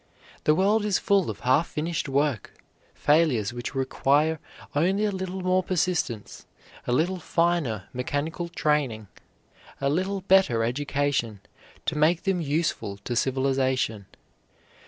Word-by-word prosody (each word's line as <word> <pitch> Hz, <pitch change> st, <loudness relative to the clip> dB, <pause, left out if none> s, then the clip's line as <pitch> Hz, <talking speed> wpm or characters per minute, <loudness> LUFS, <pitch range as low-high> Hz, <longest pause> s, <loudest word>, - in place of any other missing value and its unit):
The 150 Hz, -, +5 dB
world 205 Hz, +5 st, +3 dB
is 210 Hz, -3 st, +2 dB
full 200 Hz, -3 st, +2 dB
of -, -, -6 dB
half 130 Hz, +6 st, +3 dB
finished 155 Hz, -1 st, -3 dB
work, 140 Hz, -5 st, 0 dB, 0.4 s
failures 145 Hz, -9 st, +2 dB
which 120 Hz, +2 st, -6 dB
require 145 Hz, +4 st, +1 dB, 0.4 s
only 190 Hz, +8 st, +2 dB
a 210 Hz, -, +1 dB
little 190 Hz, 0 st, -4 dB
more 185 Hz, 0 st, +2 dB
persistence, 175 Hz, -, -2 dB, 0.4 s
a -, -, 0 dB
little 175 Hz, +9 st, +1 dB
finer 165 Hz, -, 0 dB
mechanical 150 Hz, +7 st, -3 dB
training, 140 Hz, -, 0 dB, 0.7 s
a 140 Hz, 0 st, +1 dB
little 190 Hz, +5 st, -1 dB
better 185 Hz, -12 st, +4 dB
education, 135 Hz, -3 st, -1 dB, 0.5 s
to 160 Hz, -, -1 dB
make 160 Hz, +3 st, +2 dB
them 190 Hz, -3 st, 0 dB
useful 145 Hz, -9 st, -1 dB
to 120 Hz, -, -3 dB
civilization. 130 Hz, -5 st, 0 dB
150 Hz, 125 wpm, -26 LUFS, 130-180 Hz, 0.7 s, The